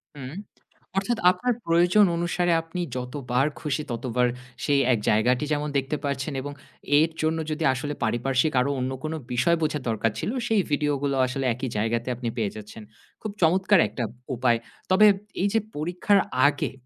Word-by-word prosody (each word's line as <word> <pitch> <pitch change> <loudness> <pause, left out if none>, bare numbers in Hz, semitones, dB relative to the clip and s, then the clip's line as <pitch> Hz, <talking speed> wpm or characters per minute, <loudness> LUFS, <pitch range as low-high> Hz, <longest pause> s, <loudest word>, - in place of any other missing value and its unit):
হুম। 135 0 -7 0.6
অর্থাৎ 210 +4 0
আপনার 245 +7 -1
প্রয়োজন 175 +5 +5
অনুসারে 175 +1 0
আপনি 165 +2 -5 0.2
যতবার 125 0 -1 0.2
খুশি 150 0 -2
ততবার, 125 +1 0 0.4
সেই 140 -2 +3
এক 115 - 0
জায়গাটি 125 +6 +2
যেমন 150 0 -1
দেখতে 140 +2 -1
পাচ্ছেন 140 -1 -2
এবং 145 +2 -6 0.5
এর 160 +1 +2
জন্য 160 +1 +1
যদি 155 +1 -2
আসলে 145 +3 -4
পারিপার্শ্বিক 130 +6 +1
আরো 140 - 0
অন্য 130 +1 -2
কোন 155 +1 -3 0.2
বিষয় 170 +7 +3
বোঝার 150 -2 -1
দরকার 115 0 0
ছিল, - - -2 0.2
সেই 220 -3 +3
ভিডিওগুলো 145 -1 0
আসলে 130 +1 -3
একই 125 +2 -4
জায়গাতে 115 +3 -1
আপনি 120 -1 -3
পেয়ে 105 -4 -1
যাচ্ছেন। 105 +1 -10 0.4
খুব 215 - -4
চমৎকার 185 +3 +4
একটা 125 - -4 0.3
উপায়। 120 -1 +2 0.3
তবে 210 +3 +7 0.3
এই 200 - +3
যে 225 - +4 0.2
পরীক্ষার 180 +6 +2 0.3
আগে, 145 -1 -1
145 Hz, 160 wpm, -25 LUFS, 125-170 Hz, 0.6 s, তবে